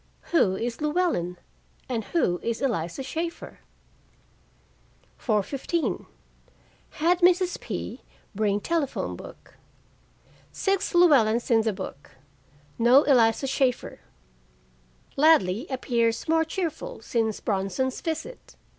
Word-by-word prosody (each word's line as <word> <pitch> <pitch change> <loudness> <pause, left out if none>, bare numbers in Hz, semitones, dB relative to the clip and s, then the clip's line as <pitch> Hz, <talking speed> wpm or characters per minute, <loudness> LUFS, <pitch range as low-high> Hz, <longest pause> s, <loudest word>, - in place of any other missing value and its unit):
Who 205 - +3
is 230 +6 -4
Llewellyn, 300 - 0 0.5
and 230 -4 -3
who 180 - 0
is 230 -1 -3
Eliza 215 -4 -2
Shaeffer? 330 +6 -5 1.6
4:15 260 - -1 0.8
Had 345 +3 +1
Mrs. 360 0 +3
P. - - -6 0.3
bring 205 -1 +1
telephone 325 -2 -2
book: - - -13 0.9
six 390 0 -1
Llewellyns 250 -10 +4
in 225 -1 +5
the 220 0 0
book; 145 -7 -9 0.6
no 245 +5 +6
Eliza 240 -2 +3
Shaeffer. 265 -2 -1 1.2
Ladley 270 - +4
appears 235 -3 0
more 325 0 +3
cheerful 360 +8 -4
since 220 -3 -1
Bronson's 200 +6 -2
visit. 325 +9 -5
260 Hz, 95 wpm, -26 LUFS, 220-330 Hz, 1.6 s, no